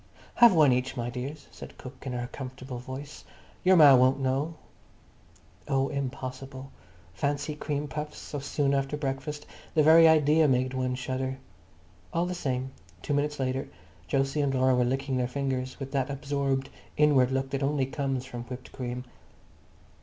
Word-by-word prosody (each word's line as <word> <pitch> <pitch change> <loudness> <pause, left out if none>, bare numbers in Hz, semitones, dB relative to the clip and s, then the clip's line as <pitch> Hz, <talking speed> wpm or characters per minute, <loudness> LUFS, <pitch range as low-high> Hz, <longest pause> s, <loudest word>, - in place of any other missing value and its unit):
"Have 235 -1 +7
one 150 -5 +6
each, 125 +1 -1
my 120 0 -2
dears," 135 +5 -6
said - - -11
cook 130 +1 -9
in 130 - -3
her 120 0 -2
comfortable 130 -1 -7
voice. 130 +4 -8 0.4
"Yer 185 +1 +6
ma 150 -5 +9
won't 130 +2 +4
know." 135 +5 -1 1.1
Oh, 135 0 +1
impossible. 135 -1 -5 0.4
Fancy 145 +7 -1
cream 150 -1 -3
puffs 150 +2 -5
so 145 - -6
soon 140 0 0
after 135 +1 0
breakfast. 140 +1 -4 0.3
The 155 - +5
very 165 +2 +8
idea 155 0 +5
made 130 -1 +1
one 130 -1 -1
shudder. 130 +1 -3 0.7
All 170 +1 +1
the 180 - -3
same, 130 -6 -2 0.3
two 145 - -1
minutes 145 +1 0
later 130 0 -1 0.4
Jose 135 +2 +1
and 135 -2 0
Laura 130 0 +3
were 125 -1 +3
licking 135 +1 -1
their 125 -1 0
fingers 130 0 -3
with 135 -1 -6
that 135 -2 0
absorbed 140 -1 -2 0.3
inward 140 -4 +4
look 135 0 -1
that 140 - -2
only 140 -1 +1
comes 135 -1 -2
from 120 -2 -7
whipped 125 0 -9
cream. 125 -1 -5
135 Hz, 160 wpm, -28 LUFS, 130-145 Hz, 1.1 s, ma